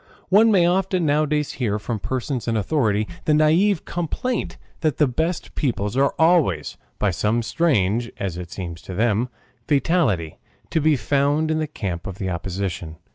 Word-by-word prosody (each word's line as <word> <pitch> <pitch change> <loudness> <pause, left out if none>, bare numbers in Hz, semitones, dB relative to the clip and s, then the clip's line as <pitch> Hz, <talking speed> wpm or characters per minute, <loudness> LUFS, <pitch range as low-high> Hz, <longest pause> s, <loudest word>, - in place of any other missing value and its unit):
One 220 +4 +6
may 185 -4 +5
often 185 0 +1
nowadays 150 0 +1
hear 105 -4 +1
from 110 +1 -4
persons 130 +1 -3
in 115 -1 +1
authority 110 -3 +1 0.2
the 150 - +3
naïve 160 +6 +3
complaint 220 - -3 0.2
that 155 -5 0
the 150 - +4
best 160 +7 -2
people 110 -6 -1
are 140 +1 +2
always, 160 - +2 0.2
by 105 - +1
some 105 +6 0
strange 115 - +1
as 95 -4 -3
it 90 -1 -7
seems 85 -3 -6
to 95 - -8
them 115 +3 +1 0.4
fatality, 135 - +1 0.3
to 160 - +1
be 155 0 +4
found 145 +5 +1
in 155 - 0
the 155 - -1
camp 95 - -5
of 95 -1 -6
the 95 -2 -3
opposition. 90 -2 -4
130 Hz, 165 wpm, -22 LUFS, 100-160 Hz, 0.4 s, One